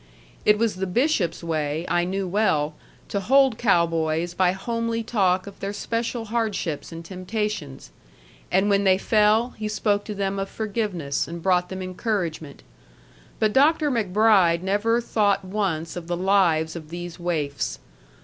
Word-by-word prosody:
It 210 0 +5
was 220 -3 0
the 190 0 -2
bishop's 185 - 0
way, 155 -1 -2
I 175 0 +1
knew 190 +1 -2
well, 165 -6 +1 0.4
to 200 - -1
hold 265 +3 +3
cow 185 -7 +4
boys 165 +1 -1
by 180 0 +3
homely 230 +3 -2
talk 190 -5 +1
of 200 - -11
their 200 +1 -4
special 230 +2 -3
hardships 215 -10 -2
and 165 0 -8
temptations. 185 - -4 0.6
And 190 +2 +3
when 200 -1 +3
they 190 -1 +4
fell 215 +4 +3
he 215 - -2
spoke 205 -1 0
to 210 - -5
them 195 0 -2
of 195 0 -3
forgiveness 200 -10 -2
and 170 +1 -6
brought 180 -1 +2
them 190 0 -5
encouragement. 180 - -3 0.7
But 215 -1 +1
Dr. 295 +2 +4
MacBride 200 -6 +3
never 210 +5 +1
thought 200 -4 +1
once 185 -5 -2
of 175 -2 -7
the 175 0 -2
lives 175 -4 +2
of 155 -2 -8
these 175 0 -7
waifs. 150 - -2
195 Hz, 155 wpm, -24 LUFS, 170-215 Hz, 0.7 s, It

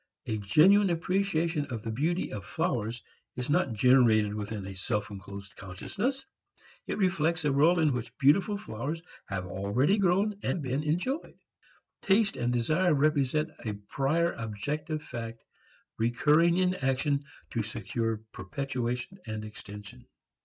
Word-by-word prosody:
A 110 -1 -2
genuine 185 - +5
appreciation 170 -3 0
of 115 -5 -5
the 115 - -3
beauty 160 +10 0
of 100 - -5
flowers 115 +4 -2 0.3
is 125 +4 -2
not 155 -6 +2
generated 110 -3 +4
within 105 -1 -4
a 95 - -6
self 105 +1 -2
enclosed 100 0 -9
consciousness. 215 - -3 0.6
It - - -2
reflects 170 -4 +1
a 145 - +3
world 160 +6 +5
in 155 -4 +3
which 120 0 -5
beautiful 175 +9 +4
flowers 155 - -5 0.2
have 95 -2 -3
already 105 - +1
grown 200 +2 +2
and - - -1
been 135 -1 -1
enjoyed. 180 - -2 0.6
Taste 200 +1 +3
and 120 - 0
desire 155 +8 +2
represent 150 +1 +2
a 110 - -2
prior 140 +11 0
objective 150 +8 -4
fact 115 -3 -7 0.6
recurring 150 +9 +4
in 185 0 +3
action 140 -1 0 0.3
to 115 - 0
secure 110 +1 -3
perpetuation 125 - -4
and 110 0 -4
extension. 105 +3 -10
135 Hz, 135 wpm, -29 LUFS, 110-170 Hz, 0.6 s, genuine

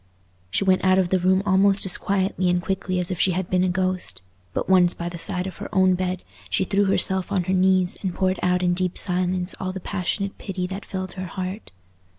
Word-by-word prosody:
She 145 - 0
went 190 -1 +2
out 185 0 +4
of 185 -2 +2
the 185 - +2
room 185 +2 +2
almost 195 0 +4
as 190 - -1
quietly 190 -2 0
and 180 0 +2
quickly 185 0 -2
as 180 0 0
if 180 - -3
she 185 - +3
had 185 0 -3
been 180 0 +3
a 185 - +2
ghost; 185 - -2 0.3
but - - -3
once 180 -2 +4
by 170 0 -4
the 170 -1 -7
side 180 0 -1
of 190 -3 -7
her - - -7
own 185 -2 +4
bed, 185 0 -2 0.3
she 95 - +1
threw 200 +1 +2
herself 190 -1 +2
on 190 -3 +1
her 185 - -1
knees 185 -1 +2
and 190 - -1
poured 185 -1 0
out 180 0 +1
in 175 0 +2
deep 180 0 -2
silence 180 0 0
all 185 0 -3
the 190 - -6
passionate 195 +2 -3
pity 185 -2 -4
that 190 +3 -6
filled 185 -2 -5
her 185 -1 -5
heart. 185 - -6
185 Hz, 230 wpm, -23 LUFS, 180-190 Hz, 0.3 s, out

